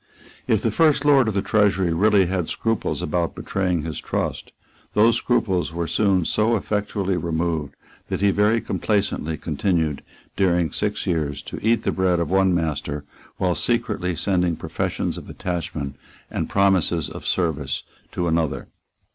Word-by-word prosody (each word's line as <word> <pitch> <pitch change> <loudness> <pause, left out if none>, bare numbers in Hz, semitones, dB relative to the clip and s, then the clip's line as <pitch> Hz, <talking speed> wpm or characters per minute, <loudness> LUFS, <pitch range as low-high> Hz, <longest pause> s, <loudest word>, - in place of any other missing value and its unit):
If - - +2
the - - +2
First 150 -3 +3
Lord 140 -4 +5
of 110 - -1
the 100 - +1
Treasury 95 -6 +2
really 100 +2 +4
had 90 -2 -1
scruples 115 -2 -1
about 85 +2 -1
betraying 90 -5 -1
his 80 -1 -4
trust, - - -3 0.4
those 115 +2 +5
scruples 95 -9 0
were 85 0 -2
soon 95 +1 +2
so 110 +6 +2
effectually 100 -2 -1
removed 80 -3 -2 0.3
that - - -1
he 100 0 +4
very 105 +3 +3
complacently 95 -6 -1
continued, 80 -1 -1 0.3
during 90 -4 +2
six 105 0 -2
years, 75 -6 -1
to - - -7
eat 115 0 +2
the - - +1
bread 95 -2 +1
of 85 0 -2
one 95 0 +4
master, 75 -3 -2 0.3
while 90 -1 +1
secretly 90 -5 0
sending 90 -2 +1
professions 80 0 -3
of - - -12
attachment 85 -5 -4 0.4
and - - -2
promises 95 -5 +2
of - - -8
service 75 -7 -1 0.3
to 85 - -1
another. 80 -2 -1
90 Hz, 150 wpm, -23 LUFS, 80-105 Hz, 0.4 s, Lord